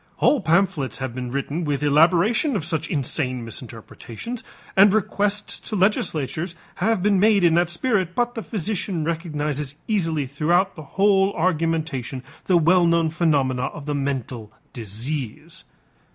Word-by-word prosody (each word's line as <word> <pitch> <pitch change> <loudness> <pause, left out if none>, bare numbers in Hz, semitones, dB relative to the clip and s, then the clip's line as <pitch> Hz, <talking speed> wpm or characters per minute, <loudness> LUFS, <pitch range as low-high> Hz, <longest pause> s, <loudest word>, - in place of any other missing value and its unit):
Whole 285 - +3
pamphlets 170 -5 +1
have 130 -3 -4
been 125 0 -5
written 140 +6 -3
with 145 -2 -1
elaboration 175 - +3
of 165 - -2
such 160 -2 -2
insane 130 -3 -1
misinterpretations 120 - -8 0.3
and 195 +1 +7
requests 205 0 0
to 215 - -2
legislatures 175 -4 0 0.2
have 220 -4 +1
been 200 -2 +3
made 205 -1 +4
in 170 -2 +5
that 170 +1 +2
spirit, 185 -1 0
but 240 0 0
the 225 - -5
physician 195 -5 -3
recognizes 150 -4 -3
easily 165 -9 0
throughout 170 +8 +1
the 155 - -8 0.2
whole 195 0 +4
argumentation 160 -7 -1 0.2
the 180 - +4
well 170 +2 +4
known 165 -1 +2
phenomena 140 -6 +1
of 145 - -9
the 150 - -2
mental 130 -6 -3 0.2
disease. 120 +3 -6
165 Hz, 140 wpm, -23 LUFS, 140-195 Hz, 0.3 s, and